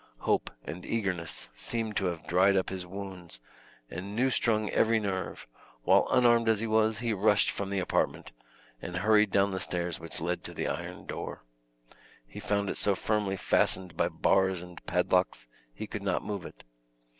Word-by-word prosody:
Hope -, -, +1 dB, 0.2 s
and 90 Hz, +2 st, -6 dB
eagerness 95 Hz, -7 st, -2 dB
seemed 115 Hz, -2 st, -2 dB
to 95 Hz, -, 0 dB
have 85 Hz, -3 st, -3 dB
dried 95 Hz, +4 st, +4 dB
up 95 Hz, -, 0 dB
his 90 Hz, -1 st, -4 dB
wounds 95 Hz, -7 st, -7 dB, 0.5 s
and 95 Hz, +8 st, -6 dB
new 130 Hz, +3 st, +2 dB
strung 110 Hz, -3 st, +2 dB
every 115 Hz, 0 st, +3 dB
nerve, 95 Hz, -3 st, -3 dB, 0.4 s
while -, -, +5 dB
unarmed 120 Hz, -2 st, +4 dB
as 110 Hz, -2 st, +3 dB
he 115 Hz, -, -1 dB
was, 110 Hz, 0 st, +2 dB
he 115 Hz, -2 st, -1 dB
rushed 105 Hz, +1 st, +3 dB
from 100 Hz, -1 st, -4 dB
the 100 Hz, -, -2 dB
apartment, 90 Hz, -, -1 dB, 0.5 s
and 90 Hz, -, -5 dB
hurried 105 Hz, +2 st, +4 dB
down 100 Hz, +1 st, +3 dB
the 95 Hz, -, -2 dB
stairs 85 Hz, -2 st, -3 dB
which 80 Hz, 0 st, -7 dB
led 85 Hz, +2 st, -2 dB
to -, -, -7 dB
the -, -, -2 dB
iron -, -, -5 dB
door. -, -, -6 dB, 0.8 s
He -, -, -10 dB
found 100 Hz, -1 st, 0 dB
it -, -, -2 dB
so 100 Hz, -, +1 dB
firmly 105 Hz, -1 st, 0 dB
fastened 90 Hz, -1 st, +2 dB
by -, -, +1 dB
bars 95 Hz, -2 st, +2 dB
and 90 Hz, -1 st, -12 dB
padlocks, 90 Hz, -2 st, +1 dB, 0.3 s
he -, -, -6 dB
could 105 Hz, -1 st, -6 dB
not 95 Hz, -2 st, -1 dB
move 100 Hz, -3 st, -4 dB
it. -, -, -15 dB
100 Hz, 180 wpm, -29 LUFS, 90-110 Hz, 0.8 s, while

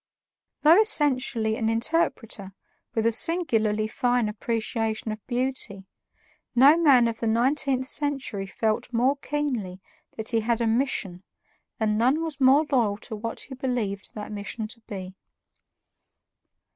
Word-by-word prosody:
Though 330 Hz, +7 st, +7 dB
essentially 255 Hz, -, +1 dB
an 225 Hz, -3 st, 0 dB
interpreter 225 Hz, -, -1 dB, 0.4 s
with 225 Hz, -1 st, 0 dB
a 230 Hz, -, +4 dB
singularly 225 Hz, -8 st, +2 dB
fine 245 Hz, 0 st, 0 dB
appreciation 225 Hz, 0 st, -2 dB
of 215 Hz, -1 st, -7 dB
beauty, 245 Hz, -6 st, -1 dB, 0.7 s
no 275 Hz, +5 st, +7 dB
man 275 Hz, -8 st, +5 dB
of 230 Hz, -1 st, -4 dB
the 230 Hz, -, -2 dB
nineteenth 260 Hz, +3 st, +1 dB
century 270 Hz, -9 st, -2 dB
felt 215 Hz, +4 st, -2 dB
more 255 Hz, +4 st, +2 dB
keenly 255 Hz, -11 st, -3 dB, 0.4 s
that 220 Hz, -1 st, -4 dB
he 230 Hz, -, +2 dB
had 230 Hz, +1 st, 0 dB
a 235 Hz, -, 0 dB
mission, 225 Hz, -6 st, -1 dB, 0.6 s
and 215 Hz, -1 st, +1 dB
none 265 Hz, +7 st, +2 dB
was 305 Hz, -4 st, -6 dB
more 270 Hz, +4 st, +5 dB
loyal 225 Hz, -7 st, +2 dB
to 220 Hz, 0 st, -8 dB
what 230 Hz, +2 st, -5 dB
he 265 Hz, -, -8 dB
believed 240 Hz, -7 st, -3 dB
that 210 Hz, 0 st, -7 dB
mission 210 Hz, +1 st, -5 dB
to 230 Hz, -, -7 dB
be. 190 Hz, -2 st, -7 dB
230 Hz, 135 wpm, -25 LUFS, 215-270 Hz, 0.7 s, Though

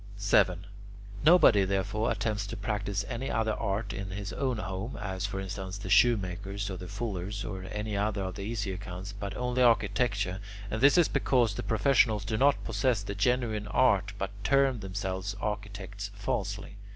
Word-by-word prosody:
7. 95 Hz, -2 st, +3 dB, 0.6 s
Nobody, 155 Hz, -, +7 dB
therefore, 100 Hz, +3 st, 0 dB
attempts 105 Hz, -1 st, -1 dB
to 100 Hz, -, -6 dB
practise 100 Hz, -1 st, -2 dB
any 130 Hz, +2 st, -4 dB
other 110 Hz, -1 st, +1 dB
art 100 Hz, +1 st, -2 dB
in 95 Hz, -1 st, -5 dB
his 100 Hz, +1 st, -5 dB
own 130 Hz, -4 st, -1 dB
home 95 Hz, +4 st, -4 dB
as, 95 Hz, +1 st, -3 dB
for 95 Hz, -1 st, -4 dB
instance, 95 Hz, 0 st, -5 dB
the 100 Hz, -, -6 dB
shoemaker's, 100 Hz, -2 st, +2 dB
or 95 Hz, -, -5 dB
the 90 Hz, -, -8 dB
fuller's, 100 Hz, -1 st, -4 dB
or 95 Hz, -2 st, -5 dB
any 105 Hz, +1 st, -4 dB
other 100 Hz, 0 st, 0 dB
of 95 Hz, 0 st, -4 dB
the 100 Hz, -, -7 dB
easier 100 Hz, -3 st, -3 dB
kinds 95 Hz, 0 st, -7 dB
but 100 Hz, -1 st, -5 dB
only 125 Hz, 0 st, 0 dB
architecture, 105 Hz, -4 st, +2 dB, 0.3 s
and 110 Hz, -, -2 dB
this 140 Hz, +5 st, +6 dB
is 175 Hz, -, +6 dB
because 120 Hz, -5 st, +2 dB
the -, -, -4 dB
professionals 110 Hz, -2 st, +2 dB
do 110 Hz, +1 st, -1 dB
not 140 Hz, +5 st, +3 dB
possess 125 Hz, -7 st, 0 dB
the 100 Hz, -, -4 dB
genuine 110 Hz, 0 st, 0 dB
art 100 Hz, -4 st, +3 dB
but 95 Hz, -1 st, -3 dB
term 135 Hz, -3 st, +3 dB
themselves 95 Hz, 0 st, -3 dB
architects 105 Hz, -1 st, -4 dB
falsely. 100 Hz, +1 st, -3 dB
100 Hz, 170 wpm, -29 LUFS, 95-110 Hz, 0.6 s, Nobody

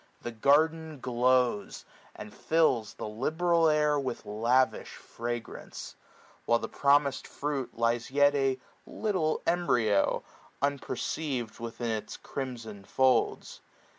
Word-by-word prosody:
The 120 Hz, -, -4 dB
garden 155 Hz, +5 st, +2 dB
glows, 125 Hz, -3 st, +1 dB, 0.3 s
and 105 Hz, -, -9 dB
fills 130 Hz, -10 st, +1 dB
the -, -, -5 dB
liberal 160 Hz, +9 st, +2 dB
air 150 Hz, -1 st, +3 dB
With 130 Hz, -3 st, -4 dB
lavish 115 Hz, +2 st, +1 dB
fragrance; 120 Hz, 0 st, -6 dB, 0.5 s
while 115 Hz, -, +4 dB
the -, -, -5 dB
promised 140 Hz, -1 st, +2 dB
firuit 140 Hz, -3 st, -3 dB
Lies 115 Hz, 0 st, 0 dB
yet 145 Hz, +1 st, +4 dB
a 135 Hz, -2 st, +1 dB, 0.3 s
little 185 Hz, -8 st, -1 dB
embryo, 120 Hz, -, +2 dB, 0.4 s
unpcrceiv'd. 140 Hz, -3 st, -2 dB
Within 115 Hz, 0 st, -4 dB
its 110 Hz, -1 st, -4 dB
crimson 115 Hz, -7 st, -6 dB
folds. 130 Hz, +5 st, +1 dB
130 Hz, 105 wpm, -29 LUFS, 115-150 Hz, 0.5 s, while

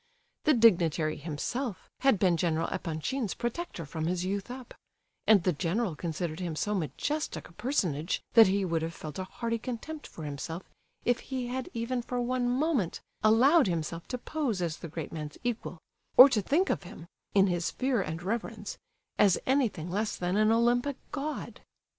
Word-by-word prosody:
The 305 Hz, -2 st, +5 dB
dignitary 170 Hz, -9 st, +4 dB
himself 180 Hz, -, -4 dB
had 270 Hz, -5 st, +4 dB
been 180 Hz, -2 st, +3 dB
General 165 Hz, -1 st, 0 dB
Epanchin's 190 Hz, -, -2 dB
protector 240 Hz, -, -4 dB
from 160 Hz, +2 st, -3 dB
his 180 Hz, +1 st, -1 dB
youth 200 Hz, +3 st, -2 dB
up; 250 Hz, 0 st, -8 dB, 0.5 s
and 210 Hz, -5 st, +6 dB
the 180 Hz, -, +2 dB
general 180 Hz, +4 st, -1 dB
considered 165 Hz, 0 st, -3 dB
him 175 Hz, -4 st, -3 dB
so 210 Hz, +6 st, -1 dB
majestic 290 Hz, -, -2 dB
a -, -, -18 dB
personage 180 Hz, -, 0 dB
that 225 Hz, -3 st, +9 dB
he 195 Hz, +1 st, +1 dB
would 165 Hz, -2 st, 0 dB
have 165 Hz, 0 st, -4 dB
felt 155 Hz, +2 st, -7 dB
a 185 Hz, -, -2 dB
hearty 230 Hz, +3 st, -3 dB
contempt 260 Hz, +7 st, -6 dB
for 160 Hz, -, -10 dB
himself 155 Hz, +4 st, -5 dB, 0.4 s
if 245 Hz, 0 st, +3 dB
he 260 Hz, -2 st, -4 dB
had 255 Hz, 0 st, -3 dB
even 240 Hz, +2 st, -1 dB
for 245 Hz, +1 st, -3 dB
one 245 Hz, 0 st, 0 dB
moment 255 Hz, -, +1 dB, 0.2 s
allowed 255 Hz, +7 st, +6 dB
himself 165 Hz, -1 st, -3 dB
to 250 Hz, -, -3 dB
pose 255 Hz, -5 st, -2 dB
as 170 Hz, -3 st, -2 dB
the -, -, -7 dB
great 160 Hz, 0 st, -6 dB
man's 150 Hz, -2 st, -6 dB
equal, 235 Hz, -6 st, -3 dB, 0.4 s
or 255 Hz, -, +13 dB
to 230 Hz, -5 st, +1 dB
think 330 Hz, -, +2 dB
of -, -, -1 dB
him—in 180 Hz, +2 st, -1 dB
his 175 Hz, -3 st, 0 dB
fear 255 Hz, -4 st, 0 dB
and 160 Hz, 0 st, -4 dB
reverence—as 205 Hz, -2 st, -1 dB
anything 235 Hz, -, +1 dB
less 210 Hz, +3 st, -1 dB
than 180 Hz, +1 st, -1 dB
an 215 Hz, +1 st, +4 dB
Olympic 240 Hz, +4 st, +2 dB, 0.2 s
God! 295 Hz, +2 st, -4 dB
200 Hz, 170 wpm, -30 LUFS, 170-245 Hz, 0.5 s, or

